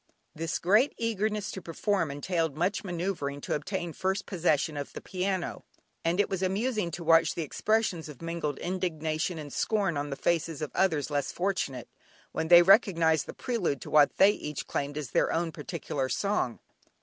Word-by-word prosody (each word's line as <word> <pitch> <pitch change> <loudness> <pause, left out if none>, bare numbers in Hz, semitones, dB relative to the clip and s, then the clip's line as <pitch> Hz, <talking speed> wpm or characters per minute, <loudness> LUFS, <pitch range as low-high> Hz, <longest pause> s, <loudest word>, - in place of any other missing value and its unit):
This 165 0 -2
great 215 +10 +3
eagerness 215 -2 -1
to 190 - -6
perform 170 0 -1
entailed 160 +1 -1
much 180 +6 0
manoeuvring 170 -6 -3
to - - -3
obtain 175 +2 -3
first 190 +3 -1
possession 160 -4 +1
of 145 -1 -5
the - - -6
piano, 185 -1 -3 0.4
and 170 +3 +1
it 205 - +4
was 190 -2 -3
amusing 205 +1 0
to 170 +1 -6
watch 165 0 +4
the 170 - -2
expressions 190 0 0
of 145 - -10
mingled 165 -4 -3
indignation 170 -2 -2
and 150 -3 -7
scorn 200 -8 0
on 145 0 -2
the 140 - -3
faces 165 0 0
of 150 - -4
others 160 -6 +1
less 145 -2 -1
fortunate, 175 -10 -2 0.4
when 160 - -2
they 175 +1 +9
recognised 170 -5 +4
the - - -6
prelude 205 - -1
to - - -8
what 150 -1 +5
they 195 - +7
each 150 -7 -5
claimed 145 +1 -3
as 145 -6 -5
their - - +2
own 165 0 0
particular 150 -4 -4
song. 200 - 0
170 Hz, 175 wpm, -29 LUFS, 150-190 Hz, 0.4 s, they